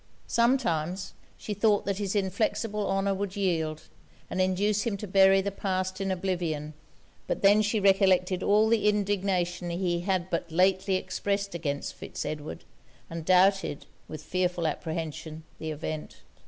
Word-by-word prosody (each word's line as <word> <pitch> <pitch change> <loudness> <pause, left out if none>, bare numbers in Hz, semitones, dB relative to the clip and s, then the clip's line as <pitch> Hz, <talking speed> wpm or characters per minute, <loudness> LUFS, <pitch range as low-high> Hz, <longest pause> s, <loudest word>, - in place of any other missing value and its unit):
Sometimes, 190 - +1 0.2
she 210 - -5
thought 205 0 +2
that 200 0 -1
his 200 0 -2
inflexible 205 +2 -1
honour 195 0 +1
would 195 0 -3
yield, 165 -6 -1 0.5
and 185 - 0
induce 200 +3 +1
him 215 -3 -1
to 210 - -6
bury 195 0 +5
the 200 +1 -2
past 185 -1 -2
in 195 - -1
oblivion. 175 -5 -2 0.5
But - - -2
then 205 +2 +6
she 215 +1 +1
recollected 190 -2 +3
all 210 +3 +4
the 220 -2 +3
indignation 190 -4 0
he 175 0 -1
had 185 0 -1
but 170 0 -2
lately 190 +3 +2
expressed 200 +2 -2
against 145 -4 -3
Fitz - - -7
Edward, 150 0 -5 0.5
and 165 0 -5
doubted, 185 -4 +3 0.2
with 155 -1 -8
fearful 180 0 -1
apprehension, 160 0 -4 0.2
the 160 - -4
event. 155 0 -6
185 Hz, 145 wpm, -28 LUFS, 170-200 Hz, 0.5 s, then